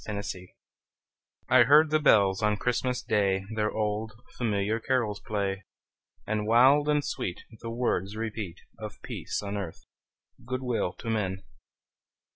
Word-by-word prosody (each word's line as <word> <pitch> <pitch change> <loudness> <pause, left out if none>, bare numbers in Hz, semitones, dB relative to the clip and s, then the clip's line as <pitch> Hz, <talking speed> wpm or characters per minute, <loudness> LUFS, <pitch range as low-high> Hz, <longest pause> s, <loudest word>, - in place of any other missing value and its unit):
CHRISTMAS 100 -1 -4
BELLS 90 0 -12 1.0
I 130 - +6
heard 150 +3 +6
the 155 - +4
bells 100 -9 +4
on 105 -1 +2
Christmas 125 +2 -1
Day 95 -2 +1
Their 105 -1 0
old, 110 +1 -2 0.2
familiar 110 -1 0
carols 115 -4 0
play, 100 -2 -2 0.6
And 105 0 -1
wild 135 +6 +5
and 150 -1 +2
sweet 90 - -3 0.2
The 115 - -6
words 115 -4 -1
repeat 110 -5 -4 0.2
Of 105 -1 -7
peace - - -4
on 100 0 -3
earth, 90 -5 -6 0.6
good 130 +1 -4
will 115 -7 -1
to 115 - -7
men! 95 -3 -2
110 Hz, 140 wpm, -28 LUFS, 100-125 Hz, 1.0 s, I